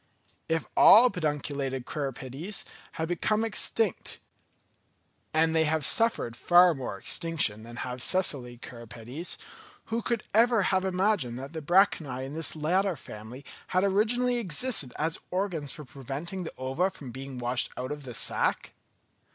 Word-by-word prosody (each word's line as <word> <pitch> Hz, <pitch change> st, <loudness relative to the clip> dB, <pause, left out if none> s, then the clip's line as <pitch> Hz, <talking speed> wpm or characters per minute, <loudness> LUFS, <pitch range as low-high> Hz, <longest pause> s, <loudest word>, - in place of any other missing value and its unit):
If 165 Hz, 0 st, 0 dB
all 235 Hz, +1 st, +8 dB
pedunculated 145 Hz, -6 st, -3 dB
cirripedes 140 Hz, -, -4 dB, 0.3 s
had 160 Hz, -, -3 dB
become 210 Hz, +6 st, 0 dB
extinct, 220 Hz, -2 st, -1 dB, 1.1 s
and 160 Hz, +1 st, +2 dB
they 160 Hz, 0 st, +4 dB
have 155 Hz, -1 st, +1 dB
suffered 210 Hz, -, +2 dB
far 175 Hz, +6 st, +5 dB
more 130 Hz, -8 st, -5 dB
extinction 155 Hz, -, +1 dB
than 120 Hz, +1 st, -10 dB
have 125 Hz, 0 st, -5 dB
sessile 130 Hz, -8 st, +2 dB
cirripedes, 120 Hz, +6 st, -6 dB, 0.6 s
who 230 Hz, -, 0 dB
would 235 Hz, -3 st, 0 dB
ever 230 Hz, -1 st, +4 dB
have 190 Hz, 0 st, +1 dB
imagined 185 Hz, -, 0 dB
that 135 Hz, +4 st, -8 dB
the 160 Hz, -, -5 dB
branchiæ 150 Hz, -6 st, +2 dB
in 135 Hz, -, -7 dB
this 160 Hz, 0 st, +1 dB
latter 180 Hz, +5 st, +1 dB
family 120 Hz, +1 st, -10 dB, 0.2 s
had 185 Hz, +1 st, +1 dB
originally 235 Hz, +5 st, +2 dB
existed 190 Hz, -, +1 dB
as 160 Hz, +2 st, -1 dB
organs 180 Hz, -6 st, -2 dB
for 150 Hz, -3 st, -9 dB
preventing 145 Hz, +8 st, -6 dB
the -, -, -7 dB
ova 135 Hz, +9 st, 0 dB
from 145 Hz, -10 st, -10 dB
being 135 Hz, +1 st, -7 dB
washed 120 Hz, 0 st, 0 dB
out 130 Hz, +2 st, -4 dB
of 150 Hz, 0 st, -5 dB
the 125 Hz, -3 st, -8 dB
sack? -, -, 0 dB
160 Hz, 145 wpm, -28 LUFS, 130-190 Hz, 1.1 s, all